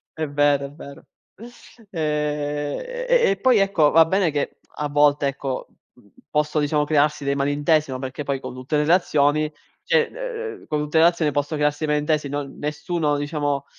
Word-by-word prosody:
È 155 -2 -3
vero, 145 -1 +2
è - - -14
vero. 140 -1 -12 0.9
Ehm, 150 -2 -2 0.3
e - - +4
e 195 - -1
poi 255 -4 +4
ecco, 190 -7 +3
va 165 0 +6
bene 185 -1 +1
che, 145 -1 -3 0.2
a 150 - -1
volte 145 0 +3
ecco, 135 -1 -4 0.3
mhmm, 105 -5 -23 0.2
posso 150 0 0
diciamo 150 0 +1
crearsi 150 -1 +1
dei 140 0 +1
malintesi, 145 +1 +1
no, 130 - -4
perché 130 +2 -5
poi 140 -1 -2
con 125 - -8
tutte 130 +4 -4
le 150 - +2
relazioni 155 -2 +2 0.3
cioè, 475 -1 +2
uhm, 470 -4 -5
uhm, - - -18
con 150 -1 -1
tutte 150 +2 +1
relazioni 165 -2 +3
posso 145 +2 -1
crearsi 150 +1 0
malintesi, 150 -1 0
no 145 0 -2
nessuno 150 +2 -2
diciamo, 145 -1 -2
150 Hz, 175 wpm, -22 LUFS, 145-160 Hz, 0.9 s, va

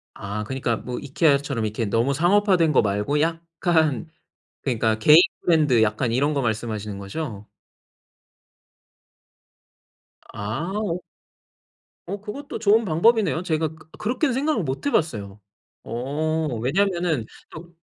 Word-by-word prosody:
아 100 +1 -5
그니까 125 -1 -2
뭐 125 +2 -6
이케아처럼 140 -4 +1
이렇게 110 +1 -2
너무 115 +7 +1
상업화된 175 0 +3
거 - - +4
말고 105 +8 0
약간 165 -2 0 0.5
그러니까 110 -4 0
개인 150 +8 +8 0.2
브랜드 150 -9 +3
약간 110 +3 0
이런 140 +5 +1
거 140 - 0
말씀하시는 110 -3 -3
거죠? 100 +1 -6 2.9
아. 170 - -3 1.1
어 200 - -4
그것도 255 +7 -7
좋은 220 +1 +4
방법이네요. 195 +1 +2
제가 160 -3 0
그 160 0 -17
그렇게는 250 +6 0
생각을 275 - 0
못 135 - -4
해 - - +3
봤어요. 105 - -1 0.4
어 150 +3 -2
왜냐하면은 175 - 0 0.2
또 170 +2 -11
150 Hz, 265 characters per minute, -23 LUFS, 115-175 Hz, 2.9 s, 개인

